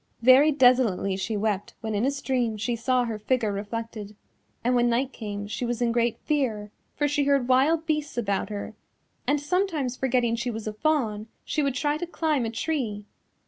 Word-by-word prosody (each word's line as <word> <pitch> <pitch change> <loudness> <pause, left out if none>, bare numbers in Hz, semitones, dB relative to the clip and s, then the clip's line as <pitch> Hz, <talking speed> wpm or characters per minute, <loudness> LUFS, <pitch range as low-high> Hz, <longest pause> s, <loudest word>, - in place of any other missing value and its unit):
Very 265 +5 +7
desolately 245 -8 +3
she 210 +3 -2
wept 205 -1 -2
when 220 -1 -3
in 210 +4 +1
a - - +3
stream 255 -5 -1
she 235 +3 -1
saw 250 +2 +1
her 225 -2 -4
figure 220 0 0
reflected, 210 0 -5 0.5
and 245 +2 +2
when 240 -1 +3
night 255 +3 0
came 205 -2 -5
she 215 - -4
was 240 -1 -1
in 240 -1 +1
great 235 -1 +1
fear, 230 -9 -1 0.2
for 290 - +1
she 290 0 +1
heard 275 -3 +2
wild 290 +6 +3
beasts 300 -4 -2
about 200 -4 -1
her, 205 -1 -5 0.5
and 290 +1 +2
sometimes 305 -5 -1
forgetting 245 -3 +1
she 235 +1 -2
was 225 -2 -5
a 215 - -3
fawn 220 -5 0 0.2
she 305 - 0
would 275 -3 0
try 290 +3 0
to 350 - -4
climb 310 -7 0
a - - -1
tree. 225 -4 -2
245 Hz, 190 wpm, -26 LUFS, 215-280 Hz, 0.5 s, Very